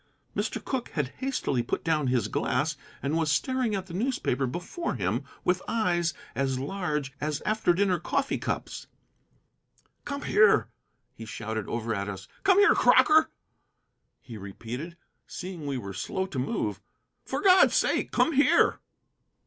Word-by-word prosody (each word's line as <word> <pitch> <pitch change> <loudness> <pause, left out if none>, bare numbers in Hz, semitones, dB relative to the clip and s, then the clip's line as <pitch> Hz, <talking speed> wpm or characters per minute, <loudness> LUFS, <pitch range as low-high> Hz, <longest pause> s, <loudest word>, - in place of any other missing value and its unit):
Mr. - - -1
Cooke 260 -3 -2
had 145 -4 -1
hastily 260 - -1
put 120 - -3
down 155 -4 +1
his 125 -2 +1
glass 150 +4 0 0.3
and 140 +3 0
was 160 -2 +1
staring 255 - +1
at 190 -1 -3
the 180 - -10
newspaper 185 - 0
before 175 - -4
him - - -1 0.2
with 180 +1 +1
eyes 175 -7 +1 0.2
as 135 -1 0
large 150 -2 -3
as 150 -1 -1
after 215 -4 +2
dinner 185 -1 +2
coffee 275 - -1
cups. - - -4 1.2
"Come 280 0 -5
here," 205 - +4 0.4
he 115 - -9
shouted 110 -1 -4
over 115 -1 -2
at 100 -1 -3
us. 95 -1 -7 0.2
"Come 385 -1 +5
here, 410 +1 +7
Crocker," 315 +1 +5 0.9
he 115 -3 -10
repeated, 120 - -7 0.3
seeing 175 -5 -6
we 140 -2 -1
were 100 -5 -6
slow 140 - -2
to 170 -9 -5
move. 105 -6 -2 0.4
"For - - -3
God's 375 -2 +6
sake, - - +2
come 325 - +2
here!" 285 +1 +4
160 Hz, 150 wpm, -27 LUFS, 125-215 Hz, 1.2 s, here